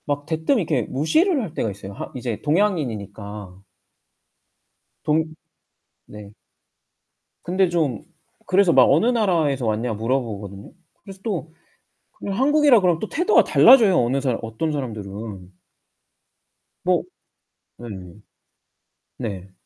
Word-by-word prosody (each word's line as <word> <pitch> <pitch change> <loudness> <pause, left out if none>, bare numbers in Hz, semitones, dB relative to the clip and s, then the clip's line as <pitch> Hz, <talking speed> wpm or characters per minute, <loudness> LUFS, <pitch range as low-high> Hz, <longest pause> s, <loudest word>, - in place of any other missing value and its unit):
막 145 -1 -3
대뜸 160 - 0
이렇게 155 - 0
무시를 295 - +1
할 185 -9 -6
때가 115 - -2
있어요, 100 0 -10
하 - - -8
이제 120 -4 -4
동양인이니까. 105 - -2 1.4
동 155 +1 +1 0.8
네. 105 -1 -12 1.1
근데 185 +1 +1
좀 155 -10 -1 0.4
그래서 185 -2 +3
막 130 - +7
어느 155 +10 +3
나라에서 170 - +1
왔냐 110 +2 -1
물어보거든요. 105 -4 -4 0.3
그래서 195 -1 -12
또 175 -8 -4 0.7
그 - - -4
한국이라 270 +3 +4
그러면 175 -3 +2
또 220 - -5
태도가 360 +7 +3
달라져요, 220 -8 +6
어느 125 +3 +1
사람 130 -4 0
어떤 115 +8 -3
사람들은. 105 -7 -6 1.3
뭐 - - +1 0.7
네. 120 - -10 1.3
네. 100 -5 -6
145 Hz, 245 characters per minute, -22 LUFS, -, 1.4 s, 막